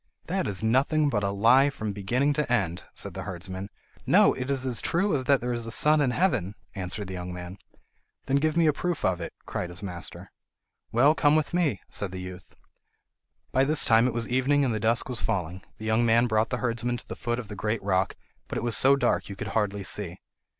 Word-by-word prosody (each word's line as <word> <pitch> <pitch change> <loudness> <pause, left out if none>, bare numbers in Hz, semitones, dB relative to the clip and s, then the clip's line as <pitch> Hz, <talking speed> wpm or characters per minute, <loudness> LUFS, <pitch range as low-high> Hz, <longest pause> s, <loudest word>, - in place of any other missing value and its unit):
"That - - -1
is 100 +1 -3
nothing 140 +6 +2
but 105 -6 0
a 100 - 0
lie 115 +8 +5
from 110 -6 -4
beginning 125 +9 +1
to 150 -4 -1
end," 95 -7 0
said 100 - -4
the 95 - -5
herdsman. 95 +1 -6 0.4
"No, - - +6
it 130 +1 -5
is 135 -2 0
as 120 -6 0
true 180 +2 +1
as 130 -2 -1
that 140 -1 +3
there 125 0 -2
is 120 -1 -4
a - - -4
sun 150 +6 +4
in 135 - +2
heaven," 125 - 0 0.2
answered 95 +2 -4
the 95 - -7
young 90 0 -5
man. 90 +2 -8 0.7
"Then 135 +1 +2
give 155 +3 +1
me 170 - +4
a 155 - +4
proof 175 +3 -2
of 90 -2 +1
it," 85 - -5
cried 90 - -4
his 90 +3 -9
master. 90 -2 -6 0.6
"Well, 135 +6 +5
come 150 -1 +3
with 155 +1 0
me," 155 - +1
said 100 -3 -3
the 95 - -6
youth. 90 0 -9 1.0
By 130 - +3
this 150 +2 +3
time 115 +2 +5
it 125 - -2
was 115 -1 0
evening 135 +3 +2
and 120 - 0
the 110 - -1
dusk 110 +2 +1
was 125 -3 -2
falling. 95 -4 -2 0.2
The 110 - -8
young 110 +2 +2
man 115 +1 +4
brought 110 -1 +1
the 125 - -1
herdsman 120 0 -1
to - - -11
the - - -6
foot 120 0 -2
of 125 -4 -6
the 105 - -7
great 105 +3 -2
rock, 95 -1 +1 0.3
but - - -4
it - - -3
was 120 -2 0
so 135 +1 +5
dark 125 -6 0
you 100 - -6
could 100 +1 -5
hardly 100 -1 -1
see. 95 -2 -3
115 Hz, 235 wpm, -27 LUFS, 95-135 Hz, 1.0 s, No